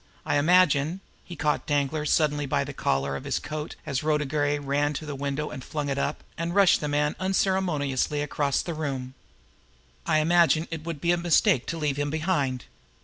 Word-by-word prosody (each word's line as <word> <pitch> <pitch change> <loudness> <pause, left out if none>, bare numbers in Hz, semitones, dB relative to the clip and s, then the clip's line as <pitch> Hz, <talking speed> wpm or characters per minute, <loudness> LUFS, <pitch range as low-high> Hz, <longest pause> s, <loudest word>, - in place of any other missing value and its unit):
I - - +1
imagine" 165 0 +3 0.2
he 175 - -9
caught 150 -1 -1
Danglar 145 +1 0
suddenly 150 -1 +1
by - - +1
the - - -7
collar 70 +1 -1
of - - -6
his - - -1
coat 155 0 -5
as 135 -2 -2
Rhoda 150 -1 +1
Gray 145 0 0
ran 145 +1 0
to 155 - -5
the 150 - -5
window 140 +2 -3
and 130 - -7
flung 150 0 -3
it 135 - -1
up, 140 +2 -2 0.2
and 170 +2 -2
rushed 200 -2 +5
the 150 - -2
man 150 +1 0
unceremoniously 170 -7 0
across 145 -2 0
the 170 - -4
room 135 -5 -4 0.9
"I 155 - +3
imagine 165 0 +3
it 160 -2 -5
would 165 -4 -5
be 170 - +2
a 175 - +3
mistake 170 -7 +3
to 165 - -3
leave 150 -3 -1
him 145 0 -1
behind. 150 -5 -1
150 Hz, 195 wpm, -26 LUFS, 140-165 Hz, 0.9 s, rushed